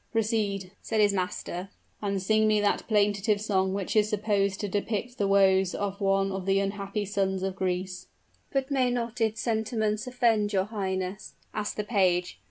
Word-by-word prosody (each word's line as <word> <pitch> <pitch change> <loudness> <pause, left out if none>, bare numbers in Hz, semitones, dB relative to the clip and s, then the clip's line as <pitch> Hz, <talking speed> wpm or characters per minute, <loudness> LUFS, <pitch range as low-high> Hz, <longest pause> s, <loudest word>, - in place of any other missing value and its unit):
"Proceed," 210 -4 0
said 220 - -1
his 205 -1 +4
master, 185 0 -3 0.3
"and 200 -2 -1
sing 215 +3 +3
me 215 -1 +3
that 205 -1 0
plaintive 205 -1 +2
song 190 -3 +1
which 200 +1 -3
is 210 -1 +4
supposed 200 -2 0
to 205 - -2
depict 210 +4 -3
the 200 - +2
woes 190 -2 +4
of 200 -1 -3
one 195 0 +2
of 190 0 -4
the 195 0 +3
unhappy 200 +1 -2
sons 190 -2 -1
of 190 -1 -2
Greece." 185 -1 -3 0.4
"But 270 0 -1
may 260 -2 +2
not 235 -1 -3
its 220 0 +1
sentiments 220 0 -1
offend 225 -4 +2
your 190 -1 +2
highness?" 190 -2 -4 0.2
asked 210 -1 -3
the 210 - -1
page. 180 - +1
205 Hz, 175 wpm, -28 LUFS, 195-215 Hz, 0.4 s, his